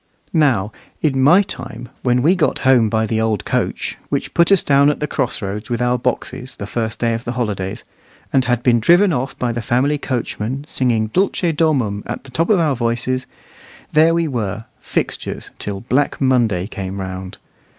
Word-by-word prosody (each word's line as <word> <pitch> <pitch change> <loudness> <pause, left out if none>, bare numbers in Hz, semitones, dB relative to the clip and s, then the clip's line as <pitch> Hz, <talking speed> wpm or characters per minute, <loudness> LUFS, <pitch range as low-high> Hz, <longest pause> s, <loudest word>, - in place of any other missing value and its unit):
Now, 125 - +2 0.3
in 135 -4 +2
my 170 +9 +6
time, 120 - -7
when 125 0 +2
we 165 +5 +5
got 160 -6 0
home 125 -4 +5
by 110 +1 +1
the 110 0 0
old 110 -3 0
coach, - - -2
which - - -2
put 170 +2 +3
us 195 - +5
down 140 0 +4
at 150 - -1
the 150 - -1
cross 125 -5 -1
roads 105 +2 -4
with 120 -1 -1
our 125 0 +1
boxes, 125 +1 -3
the 100 - -6
first 110 +1 -3
day 115 -1 +1
of 115 +1 -3
the 120 - -3
holidays, 105 -3 -3 0.5
and 130 -1 +3
had 120 -1 0
been 120 -2 +4
driven 175 - +5
off 130 -1 -3
by 125 -1 -1
the 120 0 -3
family 135 +6 +1
coachman, 130 0 -3
singing 115 -7 0
"Dulce 180 -2 +1
Domum" 130 -11 +1
at - - -5
the 135 - -14
top 165 +6 0
of 210 - +5
our 155 -5 +2
voices, 120 +2 -1 0.7
there 160 +2 +5
we 170 -1 +1
were, 110 -5 -3
fixtures, - - -3
till 100 -1 -4
black 130 +5 0
Monday 120 -9 +2
came 95 -2 -5
round. 95 -1 -6
125 Hz, 190 wpm, -19 LUFS, 110-145 Hz, 0.7 s, my